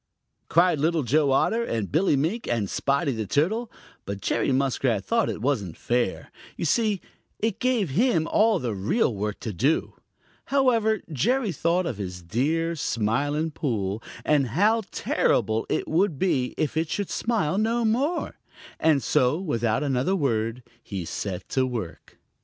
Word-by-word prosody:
cried 170 -2 +4
Little 160 +1 +1
Joe 145 +4 +2
Otter 225 - +2
and 110 - -3
Billy 160 +1 +3
Mink 165 - -1
and 115 -4 0
Spotty 140 - 0
the 110 -4 -3
Turtle, 215 - 0 0.3
but 100 0 -5
Jerry 120 - 0
Muskrat 130 -5 +1
thought 230 -1 +1
it 105 - -5
wasn't 105 - -1
fair. 120 -5 -1 0.3
You - - -2
see, 210 +3 +1 0.4
it 220 -1 -1
gave 245 - +1
him 175 - +2
all 220 +1 +3
of 175 - -2
the 120 -3 -1
real 110 - +1
work 105 +1 -3
to 110 -4 -4
do. 135 - +1 0.5
However, 230 -6 +2
Jerry 240 - +1
thought 175 +2 +1
of 125 -11 -3
his 90 -3 -6
dear 155 - 0
Smiling 145 +5 0
Pool, 110 -8 -2 0.2
and 145 -3 +3
how 210 - +2
terrible 110 +1 0
it - - -1
would 170 -1 +1
be 130 -7 0
if 155 - -1
it 160 0 0
should 200 -2 -2
smile 205 -7 0
no 230 +2 +1
more, 275 +10 0 0.4
and 155 -4 +3
so 130 +6 +2
without 115 - 0
another 135 +6 +1
word 115 - -1 0.2
he 95 -6 -5
set 95 +1 -5
to 130 -1 +1
work. 110 -9 -6
145 Hz, 160 wpm, -25 LUFS, -, 0.5 s, cried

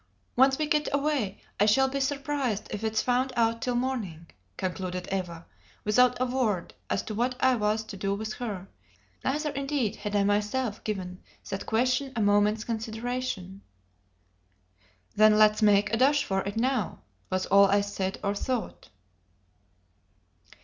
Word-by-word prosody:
"Once 265 +1 +5
we 310 - 0
get 300 0 +1
away, 280 -8 0 0.2
I 205 - +4
shall 265 +5 +4
be 275 +1 -2
surprised 275 -5 -1
if 210 +1 -4
it's 220 0 0
found 255 +1 +1
out 230 0 +1
till 250 -1 -1
morning," 230 -10 -2 0.3
concluded 180 -1 -3
Eva, 175 -3 -3 0.4
without 250 +4 +3
a 255 - +2
word 240 -8 -1 0.2
as - - 0
to 215 - -6
what 245 +4 0
I 260 0 +4
was 215 0 0
to 215 - -9
do 195 +1 -1
with 215 +1 -4
her; 200 -6 -4 0.6
neither, 300 +3 0
indeed, 275 -6 -1
had 210 0 -4
I 200 - +3
myself 210 +3 0
given 185 -4 -4 0.3
that 195 - -4
question 250 +4 +1
a - - -1
moment's 205 +1 +3
consideration. 225 -3 -4 1.5
"Then 215 0 +6
let's 215 0 +5
make 205 0 +4
a - - +3
dash 280 +4 +4
for 195 0 -1
it 200 +2 -4
now!" 250 -4 0 0.3
was 185 0 -1
all 200 +1 +6
I 200 +1 +3
said 195 -1 -3
or 200 0 +1
thought. 245 +3 -4
220 Hz, 155 wpm, -28 LUFS, 200-255 Hz, 1.5 s, Then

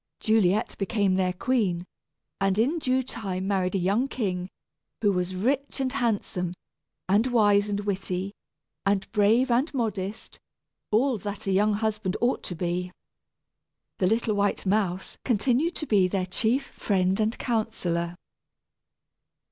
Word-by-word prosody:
Juliet 215 -2 +2
became 200 -1 +1
their 185 -1 +2
queen, 185 -4 0 0.5
and 195 0 +1
in 275 +10 +2
due 260 -2 +1
time 195 -6 -4
married 190 -2 0
a - - +3
young 200 +8 +1
king, 185 -8 -2 0.5
who 205 -2 +3
was 180 0 -1
rich 270 +9 -1
and 260 -1 0
handsome, 205 -8 -1 0.5
and 205 +6 +3
wise 210 -4 +4
and 205 0 -1
witty, 195 -1 -2 0.5
and 195 -1 +1
brave 225 +5 +3
and 255 +7 +2
modest 210 -4 -3 0.5
all 240 +2 +2
that 205 +1 -6
a 195 - 0
young 210 +3 +3
husband 215 -2 -1
ought 240 +2 +1
to 175 - -4
be. 180 +1 -2 1.1
The 185 - +3
little 225 +1 +1
white 205 0 0
mouse 190 -2 -1
continued 255 - +1
to 305 - -3
be 200 -8 +4
their 185 0 -1
chief 225 +8 0
friend 190 -1 0
and 220 +1 +1
counsellor. 180 -8 -1
205 Hz, 140 wpm, -26 LUFS, 185-230 Hz, 1.1 s, wise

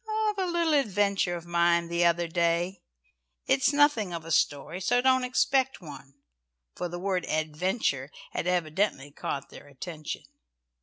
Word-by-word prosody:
"Of 410 - -8
a 375 - 0
little 340 -2 +1
adventure 200 -8 +1
of 170 -1 -7
mine 170 0 +2
the 170 +1 +1
other 170 0 +2
day. 170 +2 0 0.6
It 135 - +3
is 275 - +3
nothing 285 -10 +3
of 165 -1 -5
a 165 - -6
story, 150 +4 0
so 245 +6 +2
don't 260 0 +3
expect 265 +1 +1
one;" 140 -4 -11 0.6
for 180 - -3
the 175 - -5
word 185 -1 -1
"adventure" 155 - -1 0.2
had - - -3
evidently 170 -4 0
caught 140 -1 -5
their - - -12
attention. 155 +3 -7
175 Hz, 155 wpm, -28 LUFS, 160-215 Hz, 0.6 s, It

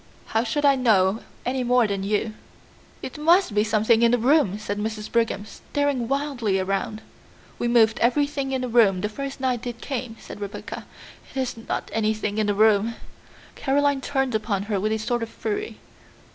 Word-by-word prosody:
How 225 +1 +3
should 290 +5 -1
I 280 - +7
know 215 -5 +3 0.3
any 255 +1 0
more 245 -1 +4
than 200 -2 -2
you?" 210 +2 -1 0.7
"It 260 - -6
must 335 - +4
be 210 0 +3
something 220 +1 +3
in 235 - +5
the 245 - +3
room," 245 - +3
said 205 -1 -4
Mrs. 215 0 -4
Brigham, 230 -3 0
staring 285 0 -2
wildly 265 -7 0
around. 195 +3 -2 0.6
"We 240 - 0
moved 230 -2 +4
everything 280 +2 +1
in 260 -1 -1
the 255 - -2
room 220 -6 +4
the 210 - -1
first 275 +5 -6
night 250 -2 -1
it 240 -1 -5
came," 250 -4 -5
said - - -10
Rebecca; 200 +1 -6 0.4
"it - - -11
is 260 -2 -2
not 225 - -5
anything 215 -1 0
in 215 - +1
the 205 - +1
room." 215 +1 +3 0.6
Caroline 285 0 +1
turned 270 -2 -1
upon 215 -3 -1
her 205 -1 -1
with 215 +3 0
a 220 - +1
sort 235 +2 -1
of 230 - -3
fury. 420 - -4
230 Hz, 185 wpm, -24 LUFS, 215-265 Hz, 0.7 s, I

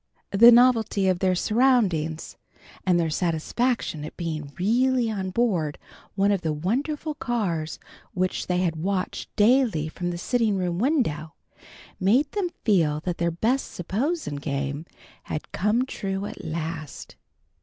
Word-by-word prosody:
The 235 +4 +8
novelty 230 -5 +4
of 185 -2 +2
their 185 -1 +2
surroundings 190 -8 +1 0.5
and 180 -2 +4
their 165 -2 0
satisfaction 170 - -1
at 155 - -8
being 155 -4 -4
really 240 +4 +2
on 190 -3 -3
board 185 -9 0 0.4
one 200 +1 +3
of 195 -3 +1
the 160 -3 -1
wonderful 280 - -2
cars 195 - -2 0.4
which 185 0 -1
they 180 0 +1
had 165 -3 0
watched 185 +3 -2
daily 215 - +3
from 175 +2 -4
the 175 - -3
sitting 225 +2 +1
room 175 -1 -1
window, 195 - 0 0.6
made 240 +10 +3
them 395 -4 -1 0.2
feel 160 -8 +2
that 175 0 -3
their 170 0 +2
best 225 +11 -1
"S'posen" 205 - -2
game 140 +2 -3 0.4
had 155 - -5
come 215 +6 +1
true 195 -5 -4
at 195 - -8
last. 160 -2 -5
190 Hz, 140 wpm, -25 LUFS, 165-235 Hz, 0.6 s, The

